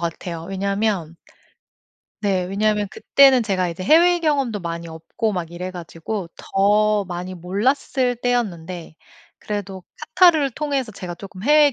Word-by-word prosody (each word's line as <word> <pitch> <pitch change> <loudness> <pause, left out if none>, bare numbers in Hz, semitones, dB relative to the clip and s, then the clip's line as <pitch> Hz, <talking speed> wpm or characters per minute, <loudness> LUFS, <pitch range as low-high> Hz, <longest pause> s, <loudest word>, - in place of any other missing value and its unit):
같아요. 170 0 -4
왜냐면 195 -3 -1 1.0
네 190 -3 +1
왜냐면 210 +2 0
그때는 270 -3 +5
제가 185 -4 0
이제 175 +2 -6
해외 345 - +5
경험도 275 - 0
많이 170 0 -5
없고 165 +7 -3
막 175 -3 -4
이래 180 +2 -5
가지고 175 +2 -6
더 210 +1 +2
많이 180 +1 -6
몰랐을 245 - 0
때였는데 185 -9 -2 0.4
그래도 195 -3 -5 0.3
카타르를 320 -7 +5
통해서 270 -4 -2
제가 175 -2 -7
쪼끔 190 0 -10
해외 295 +1 +5
200 Hz, 295 characters per minute, -21 LUFS, 180-245 Hz, 1.0 s, 그때는